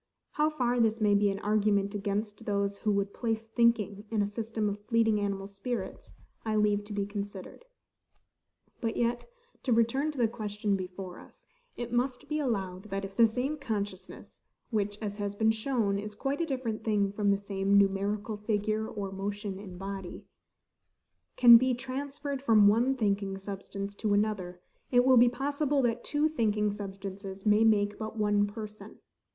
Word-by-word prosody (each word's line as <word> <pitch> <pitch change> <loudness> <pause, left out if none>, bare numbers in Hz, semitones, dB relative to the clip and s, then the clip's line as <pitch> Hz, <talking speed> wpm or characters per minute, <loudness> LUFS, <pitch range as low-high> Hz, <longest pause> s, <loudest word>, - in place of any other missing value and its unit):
How 300 +1 +2
far 245 -5 0
this 225 -1 +2
may 210 -2 +3
be 205 0 +4
an 195 - -2
argument 205 -1 +2
against 205 +2 -3
those 200 -1 0
who 215 - +1
would 200 0 -1
place 225 -2 -2
thinking 225 -3 +2
in 215 -2 +1
a - - -1
system 220 0 -2
of 205 0 -3
fleeting 225 -1 +2
animal 200 -1 -2
spirits, 200 +5 -5 0.3
I 220 -1 -1
leave 210 -1 +2
to 210 - -7
be 200 -1 -1
considered. 205 - -7 1.1
But 225 -2 -2
yet, 240 - 0 0.3
to 255 - -2
return 235 +6 +2
to 300 - -6
the 235 -2 +3
question 210 -2 -2
before 185 -1 -6
us, - - -17 0.3
it 240 0 -5
must 250 +2 -1
be 305 +1 -1
allowed, 195 -8 -2
that, 195 -1 -3
if 195 0 -10
the 230 +1 +6
same 255 +7 -2
consciousness 205 -8 -5 0.3
(which, 205 -2 -1
as 205 -1 -4
has 205 -1 -3
been 220 +1 +3
shown, 220 -3 0
is 210 +1 -6
quite 275 +7 -2
a 335 - 0
different 255 -6 -3
thing 205 -3 +1
from 205 0 0
the 200 - +4
same 200 0 +1
numerical 200 +2 +1
figure 215 +1 -1
or 200 -3 -5
motion 200 0 -4
in 185 -3 -9
body) 195 -1 -6 1.1
can 240 -2 +10
be 255 +1 +1
transferred 275 +2 -5
from 220 -6 +6
one 240 +6 +3
thinking 200 -4 0
substance 200 0 -6
to 205 0 0
another, 195 -4 -1 0.3
it 245 -1 +4
will 260 -1 +6
be 240 +1 +7
possible 285 +2 0
that 240 0 0
two 295 +1 +1
thinking 215 -8 +1
substances 195 -1 -7
may 210 +1 +5
make 205 -2 +3
but 220 0 -5
one 205 -1 +2
person. 215 0 -9
210 Hz, 170 wpm, -30 LUFS, 200-235 Hz, 1.1 s, can